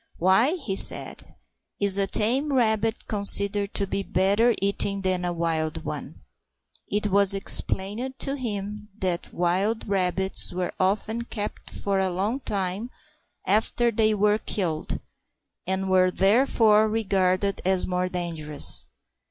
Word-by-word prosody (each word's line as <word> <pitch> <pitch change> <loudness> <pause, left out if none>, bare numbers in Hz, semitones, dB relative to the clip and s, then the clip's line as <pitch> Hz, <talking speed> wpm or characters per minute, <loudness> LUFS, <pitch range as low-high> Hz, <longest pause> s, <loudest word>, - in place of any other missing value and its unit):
"Why," 190 - +3
he 255 - -4
said, - - +2 0.6
"is 200 -1 +4
a 195 - +1
tame 260 +10 +1
rabbit 225 -2 0
considered 200 -1 +2
to 200 - +3
be 195 +1 -3
better 200 +5 +2
eating 200 0 0
than 185 -1 0
a 175 - -1
wild 160 -1 -2
one?" - - -7 0.7
It 210 0 -1
was 200 0 +4
explained 210 +6 0
to 275 +1 -2
him 210 -4 -5
that 180 -4 -3
wild 190 +7 -1
rabbits 190 -1 +1
were 180 0 -3
often 220 +5 -1
kept 210 -3 -6
for 200 -1 -2
a 190 -1 0
long 200 +8 -2
time 200 0 -3 0.6
after 225 +4 +2
they 215 -1 +2
were 210 +1 +2
killed, 170 -9 -3 0.7
and 190 +1 -2
were 185 -1 +3
therefore 215 +2 +3
regarded 195 -2 0
as 190 0 +2
more 180 0 -2
dangerous. 165 -5 -2
200 Hz, 130 wpm, -25 LUFS, 185-215 Hz, 0.7 s, is